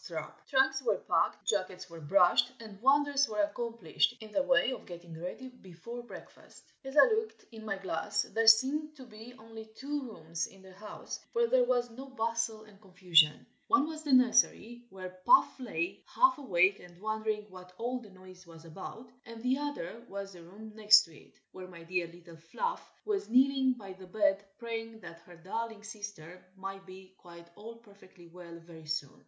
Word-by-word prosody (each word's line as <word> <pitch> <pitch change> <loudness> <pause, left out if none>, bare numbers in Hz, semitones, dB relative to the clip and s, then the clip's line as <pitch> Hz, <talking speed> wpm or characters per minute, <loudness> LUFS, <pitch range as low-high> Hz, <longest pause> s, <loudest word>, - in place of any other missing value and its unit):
Trunks 265 -1 +3
were - - +1
packed, - - +1
jackets 185 -3 -1
were 165 -2 -11
brushed, 180 - +4
and 215 -3 -11
wonders 280 0 +3
were 210 -1 +1
accomplished 235 +3 -1
in 220 -1 -11
the 285 - +2
way 265 -2 +3
of 255 - -7
getting 175 -2 -10
ready 230 +9 -6
before 235 0 -10
breakfast. 240 - -14 0.2
As 270 +2 -7
I - - +11
looked 445 -2 0
in 220 -1 -10
my 205 -2 -3
glass, 195 +2 -2
there 225 0 -1
seemed 285 +7 +5
to 265 -3 -12
be 230 +1 -12
only 220 0 -11
two 280 -2 -4
rooms 165 -4 -4
in 195 -1 -18
the 190 0 -14
house 210 +2 -8
where 470 0 +3
there 255 - +4
was 245 -1 0
no 265 +4 -9
bustle 230 -3 -2
and 210 -2 -19
confusion: 180 -6 +3 0.2
one 285 0 +4
was 310 0 -6
the 295 -2 -3
nursery, 240 -1 +3
where 185 -2 -9
Puff 345 - +5
lay, 195 -5 -3
half 345 -2 +4
awake 190 -6 +3
and 175 0 -15
wondering 215 0 -2
what 180 -1 -12
all 245 +2 -2
the 220 -4 -14
noise 185 -1 -15
was 165 0 -14
about; 215 +8 -9 0.2
and 230 0 -10
the 260 +2 +1
other 235 -7 -5
was 200 0 -6
the 175 - -12
room 205 +6 -12
next 215 0 +7
to 165 -4 -15
it, - - -19
where 185 0 -9
my 170 -2 -12
dear 175 0 -1
little 170 0 -14
Fluff 475 - -4
was 410 -1 -2
kneeling 265 +1 +4
by 200 -6 -10
the 185 0 -13
bed, 200 0 +1
praying 225 -1 -6
that 170 -2 -11
her 175 - -13
darling 220 +5 -5
sister 205 -6 -9
might 195 0 -7
be 185 0 -13
"quite 170 -1 -14
all 225 +3 -10
perfectly 200 -5 -18
well" 170 0 -11
very 160 -2 -13
soon. 145 -3 -3
215 Hz, 185 wpm, -31 LUFS, 185-245 Hz, 0.2 s, I